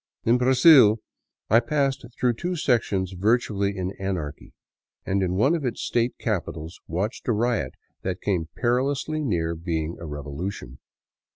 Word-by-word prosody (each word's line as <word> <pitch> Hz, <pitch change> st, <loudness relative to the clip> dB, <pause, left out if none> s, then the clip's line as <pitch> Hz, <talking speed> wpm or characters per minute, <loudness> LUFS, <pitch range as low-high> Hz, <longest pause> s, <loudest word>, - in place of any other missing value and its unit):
In 120 Hz, +2 st, +3 dB
Brazil 130 Hz, -3 st, +7 dB, 0.5 s
I 115 Hz, -, +6 dB
passed 135 Hz, +2 st, 0 dB, 0.2 s
through 125 Hz, -1 st, +3 dB
two 175 Hz, +9 st, -3 dB
sections 110 Hz, -, +1 dB
virtually 100 Hz, -1 st, +1 dB
in 95 Hz, 0 st, -2 dB
anarchy, 90 Hz, -7 st, -4 dB, 0.5 s
and 95 Hz, +1 st, 0 dB
in 90 Hz, -1 st, 0 dB
one 135 Hz, -, +3 dB
of 165 Hz, -4 st, -1 dB
its 125 Hz, -3 st, -2 dB
state 120 Hz, +1 st, 0 dB
capi 105 Hz, -6 st, -2 dB
tals 80 Hz, +1 st, -8 dB
watched 95 Hz, +8 st, -3 dB
a -, -, +3 dB
riot 110 Hz, -, 0 dB, 0.3 s
that 95 Hz, 0 st, -3 dB
came 85 Hz, -6 st, -1 dB
perilously 135 Hz, +5 st, 0 dB
near 85 Hz, -, 0 dB
being 80 Hz, -1 st, -3 dB
a 85 Hz, -, -7 dB
revolution. 75 Hz, -1 st, -6 dB
105 Hz, 150 wpm, -25 LUFS, 85-125 Hz, 0.5 s, Brazil